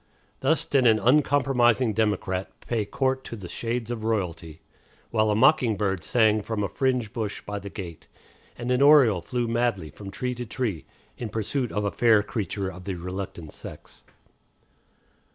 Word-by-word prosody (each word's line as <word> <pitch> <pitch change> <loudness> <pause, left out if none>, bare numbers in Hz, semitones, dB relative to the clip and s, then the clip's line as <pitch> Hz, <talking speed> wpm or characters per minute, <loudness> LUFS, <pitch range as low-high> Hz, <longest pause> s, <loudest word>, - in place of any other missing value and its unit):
Thus - - +1
did 130 -3 +3
an 110 -1 +5
uncompromising 130 -3 +3
democrat 100 -3 0
pay 115 -3 -2
court 130 +4 -1
to - - -6
the 95 -5 -8
shades 115 +3 -3
of 115 -2 -4
Royalty, 85 -8 -3 0.5
while 110 -1 +2
a 105 - +2
mocking 115 -2 +4
bird 95 -4 -1
sang 110 0 +3
from 105 0 -3
a - - 0
fringe 125 -4 -1
bush 110 -4 -3
by 105 0 -5
the 100 0 -8
gate, 90 -5 -8 0.5
and 120 +1 -3
an 125 +1 +2
oriole 140 - +6
flew 120 +5 -2
madly 115 -8 0
from 100 -2 -9
tree 125 +6 -3
to 125 0 -5
tree 110 -8 -3 0.3
in 120 - -4
pursuit 115 +4 -2
of 105 - -1
a 100 - 0
fair 115 -3 +4
creature 100 -2 -3
of 90 -1 -8
the 95 - -3
reluctant 90 -2 -6
sex. - - -11
110 Hz, 170 wpm, -26 LUFS, 100-125 Hz, 0.5 s, oriole